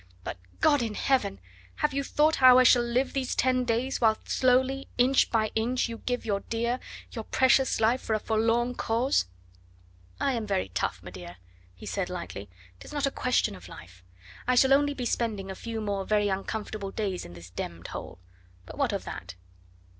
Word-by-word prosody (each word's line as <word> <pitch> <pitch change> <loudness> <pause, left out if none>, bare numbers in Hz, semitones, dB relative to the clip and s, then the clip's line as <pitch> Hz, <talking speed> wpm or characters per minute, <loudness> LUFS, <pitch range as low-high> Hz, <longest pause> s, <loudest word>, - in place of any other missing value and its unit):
but, 90 - -6 0.2
God 290 -3 +4
in 225 -3 -3
Heaven! 260 - +1 0.4
have 300 -1 0
you 280 0 0
thought 305 +3 +2
how 255 -1 +8
I 255 - +7
shall 245 0 +6
live 240 +3 0
these 265 -2 -1
ten 255 0 +2
days, 245 +3 -1
whilst 220 -2 +2
slowly, 260 +1 +2
inch 255 +2 +4
by 220 -2 +1
inch, 240 +4 0
you 230 -1 -7
give 245 0 -3
your 200 -3 0
dear, 235 +4 -2 0.3
your 225 - -5
precious 260 +2 +3
life 230 +4 +2
for 220 - -1
a - - 0
forlorn 230 +3 +1
cause? 235 - +1 0.9
"I 275 - +1
am 225 -3 -3
very 195 - -1
tough, 90 - -2
m'dear," 90 -1 -9 0.4
he 90 - -12
said 195 -3 -2
lightly; 170 - -6 0.3
"'tis - - -11
not 290 -1 0
a 275 - 0
question 250 - 0
of 90 -1 -12
life. 90 +1 -13 0.4
I 255 - +3
shall 265 +2 +5
only 285 +1 +3
be 250 - -4
spending 210 -5 -2
a - - -6
few 230 +1 -5
more 200 -2 -2
very 205 0 +1
uncomfortable 200 +1 -3
days 195 -3 -3
in 85 - -10
this 85 +1 -12
d 90 - -3
d 85 0 -12
hole; - - -7 0.5
but - - -11
what - - +1
of - - -2
that?" - - -8
230 Hz, 190 wpm, -28 LUFS, 200-255 Hz, 0.9 s, how